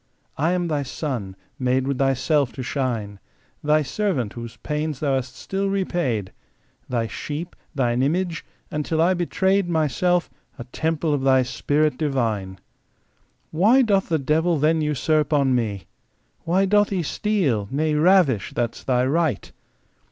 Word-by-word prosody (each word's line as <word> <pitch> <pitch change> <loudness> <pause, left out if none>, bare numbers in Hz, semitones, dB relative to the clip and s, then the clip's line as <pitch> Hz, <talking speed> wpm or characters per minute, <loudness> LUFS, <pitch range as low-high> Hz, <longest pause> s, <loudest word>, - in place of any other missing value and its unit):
I 160 +5 +1
am 180 -1 0
Thy 150 -3 0
son, 125 -8 -4 0.2
made 130 0 +1
with 140 -1 -2
Thyself 135 0 +2
to 130 - -5
shine, 115 -7 -3 0.4
Thy 150 +1 +3
servant, 145 - -1
whose 115 -1 -8
pains 150 -1 -3
Thou 140 -3 0
hast 130 -1 -2
still 195 +5 -2
repaid, 170 - -1 0.6
Thy 120 -2 0
sheep, 155 +8 -6 0.2
Thine 125 -2 +1
image, 170 +4 0 0.3
and—till 150 +1 -2
I 170 +3 +4
betray'd 190 +2 +1
Myself—a 160 -2 -1
temple 160 -1 0
of 145 - 0
Thy 130 -1 +4
Spirit 145 +3 0
divine. 115 -10 -1 0.9
Why 215 +11 +4
doth 200 -4 +1
the 165 - +2
devil 160 +4 +1
then 155 +2 +2
usurp 150 +1 +1
on 140 -3 +3
me? 110 -6 -1 0.6
Why 185 +4 +2
doth 205 +1 +3
he 185 -4 -1
steal, 150 - 0
nay 155 +3 0
ravish, 150 - +3
that's 120 -1 -2
Thy 125 -1 +1
right 150 - 0
150 Hz, 140 wpm, -23 LUFS, 130-170 Hz, 0.9 s, I